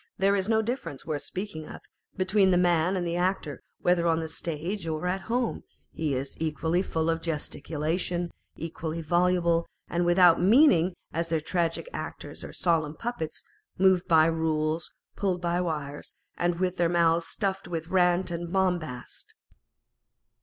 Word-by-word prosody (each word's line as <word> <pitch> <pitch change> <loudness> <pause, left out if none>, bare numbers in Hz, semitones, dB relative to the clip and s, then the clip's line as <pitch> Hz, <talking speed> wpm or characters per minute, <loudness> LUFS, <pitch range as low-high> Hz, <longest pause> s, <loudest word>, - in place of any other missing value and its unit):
465 200 +1 +3
is 200 - -5
no 220 -1 +3
difference, 235 - -4
worth 150 -3 -2
speaking 185 -5 -5
of, - - -9 0.4
between 190 +1 +3
the 180 - +4
man 175 +1 +3
and 175 - -1
the 170 0 -1
actor 175 -5 -1
â€" - - -36
whether 175 -1 +3
on 165 -1 +3
the 160 - -3
stage 165 +4 -4
or 155 +1 -2
at 185 +2 0
home, 240 0 0 0.3
he 155 -4 -1
is 135 +2 -4
equally 160 +2 0
full 160 -4 -1
of 165 0 0
gesticulation, 165 +2 -2 0.2
equally 165 0 -5
voluble, 170 0 +2 0.2
and 175 +1 0
without 175 -1 +5
mean 245 - +7
ingâ€" 175 +2 +2 0.2
as 165 +1 -1
their 165 -1 +1
tragic 170 - -1
actors - - -7
are - - -7
solemn 160 -3 0
puppets, 230 -9 -4 0.3
moved 185 -1 +4
by 160 -2 +6
rules, 160 0 0 0.2
pulled 185 -3 0
by 175 0 0
wires, 150 -4 -4 0.2
and 175 0 0
with 185 -1 0
their 170 -1 +2
mouths 170 -1 +3
stuffed 195 -3 -2
with 165 -1 -4
rant 180 0 +3
and 170 0 -4
bombast. 175 -10 -2
170 Hz, 160 wpm, -27 LUFS, 160-185 Hz, 0.4 s, mean